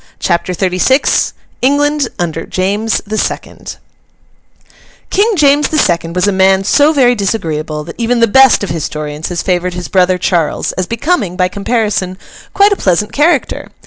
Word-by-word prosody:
CHAPTER 175 +1 -1
XXXVI 190 - +1 0.3
ENGLAND 290 +1 +1
UNDER 165 -2 -3
JAMES 205 +4 -1
THE 215 +1 -3
SECOND - - -5 1.4
King 420 +4 +2
James 295 -2 +3
the 310 - -1
Second 170 - 0
was 180 +2 +1
a - - +2
man 190 0 +3
so 290 +9 +3
very 260 -5 +3
disagreeable, 160 -8 -3
that 170 +7 -11
even 235 +1 0
the 230 - +5
best 265 +1 +4
of 200 - -3
historians 155 -1 -5
has 175 -2 -3
favoured 180 -1 -1
his 180 -1 -6
brother 185 -1 +2
Charles, 170 -3 -1
as 185 -1 -4
becoming, 230 - -1
by 185 -1 +2
comparison, 200 -2 -2 0.3
quite 405 +1 +3
a - - +2
pleasant 210 - 0
character. 300 0 0
195 Hz, 155 wpm, -13 LUFS, 180-260 Hz, 1.4 s, the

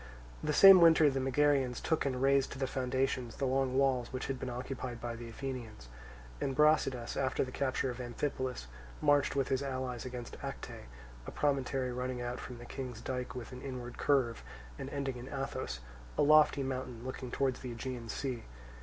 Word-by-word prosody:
The 150 - +1
same 190 +4 +10
winter 160 -3 +7
the 135 - -1
Megarians 135 -1 +2
took 160 -3 0
and 130 -2 -1
razed 135 0 +3
to - - -8
the 135 - 0
foundations 130 -2 -1
the 140 - -1
long 130 0 +1
walls 130 -3 +2
which 130 - -3
had 135 -2 -3
been 130 - -4
occupied 125 -1 -5
by 120 0 -4
the 115 0 -8
Athenians; 115 - -6 0.5
and 135 - -1
Brasidas 150 -5 +3
after 130 -1 +1
the 130 - -6
capture 130 -1 0
of 125 +1 -6
Amphipolis 130 - -3 0.3
marched 145 -2 +3
with 135 -2 +1
his 130 0 +1
allies 130 -3 -3
against 125 -2 -7
Acte, - - -7 0.4
a - - -5
promontory 135 -3 0
running 125 0 -3
out 120 0 -3
from 125 - -7
the 120 - -10
King's 125 -3 -6
dike 125 -1 -4
with 125 0 -6
an 125 0 -8
inward 125 -3 -6
curve, 130 - +2 0.4
and - - -5
ending 135 -3 -3
in 120 +1 -8
Athos, 135 - -4 0.4
a - - +4
lofty 150 -1 +6
mountain 130 -2 -4
looking 130 -1 -5
towards 130 0 0
the 125 - -6
Aegean 120 0 -5
Sea. 125 0 -3
130 Hz, 185 wpm, -33 LUFS, 125-135 Hz, 0.5 s, same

